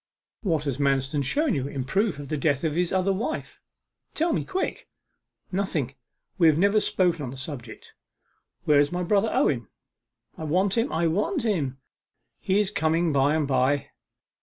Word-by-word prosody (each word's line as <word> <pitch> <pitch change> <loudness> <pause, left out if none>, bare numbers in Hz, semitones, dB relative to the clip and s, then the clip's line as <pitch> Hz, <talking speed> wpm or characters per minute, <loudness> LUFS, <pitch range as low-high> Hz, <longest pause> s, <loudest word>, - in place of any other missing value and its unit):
'What 165 - 0
has 140 -2 -3
Manston 140 0 +1
shown 285 - +1
you 135 -4 -1
in 140 -2 -4
proof 190 - 0
of 145 -1 -8
the 155 - -1
death 140 -1 0
of 160 -2 0
his 175 +2 0
other 190 +1 +2
wife? 200 +5 -4 0.5
Tell 330 +1 +1
me - - 0
quick.' 380 -1 -3 0.6
'Nothing 175 -9 -1 0.5
we 165 - +6
have 155 -2 +4
never 200 +4 +4
spoken 175 -6 +1
of 130 - -4
the 135 - -8
subject. 130 -2 -7 0.7
Where 150 -1 +5
is 145 0 +2
my 180 0 -2
brother 205 +4 +2
Owen? 120 -7 +1 0.7
I 160 - -4
want 185 +5 +1
him, 235 +3 +1
I 170 - 0
want 210 - 0
him!' 155 - -1 0.6
'He 190 +2 +1
is 205 -2 +1
coming 160 +1 +1
by 140 +2 +3
and 155 -3 0
by. 135 +1 +1
160 Hz, 175 wpm, -26 LUFS, 140-195 Hz, 0.7 s, we